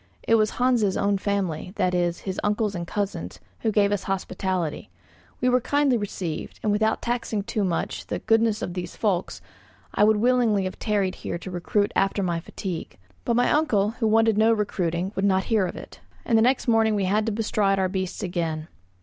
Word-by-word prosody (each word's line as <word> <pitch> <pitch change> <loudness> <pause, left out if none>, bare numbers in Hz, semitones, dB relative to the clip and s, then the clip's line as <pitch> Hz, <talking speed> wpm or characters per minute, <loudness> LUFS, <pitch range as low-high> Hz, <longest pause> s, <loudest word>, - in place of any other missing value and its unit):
It - - +3
was 215 -1 +4
Hans' 245 -6 +2
own 200 0 +1
family, 190 -4 -2
that 185 -3 +1
is, 175 -1 0
his 190 -1 -4
uncles 210 0 0
and 170 -2 -5
cousins, 205 0 -3 0.2
who 220 - 0
gave 205 -1 +3
us 205 -2 -1
hospitality; 185 -3 -2 0.5
we 250 - +2
were 250 0 +3
kindly 285 0 +2
received, 195 -7 -4
and 210 - +2
without 220 +1 +1
taxing 235 -4 -1
too 215 -1 -2
much 175 -3 -2
the - - -2
goodness 225 -1 +2
of 175 - -4
these 175 -1 -5
folks, 190 -5 -1 0.5
I - - +3
would 215 0 +5
willingly 230 -3 +3
have 185 - -5
tarried 200 -4 0
here - - -5
to 185 +2 -8
recruit 200 +4 0
after 195 +1 +1
my 170 -2 0
fatigues. 170 - -6 0.3
But 235 - +1
my 245 +1 +3
uncle, 215 -10 +2
who 225 -1 -1
wanted 225 -1 +3
no 220 +1 +5
recruiting, 185 -4 -1
would 195 - -1
not 190 -1 +3
hear 205 -4 +3
of - - -7
it, - - -10 0.3
and 230 - +2
the 220 - +5
next 255 +3 +2
morning 225 -2 +3
we 200 -2 0
had 210 +4 +1
to - - +1
bestride 210 -2 +1
our 190 -1 +2
beasts 185 -1 -3
again. 165 -3 -3
205 Hz, 200 wpm, -25 LUFS, 185-225 Hz, 0.5 s, would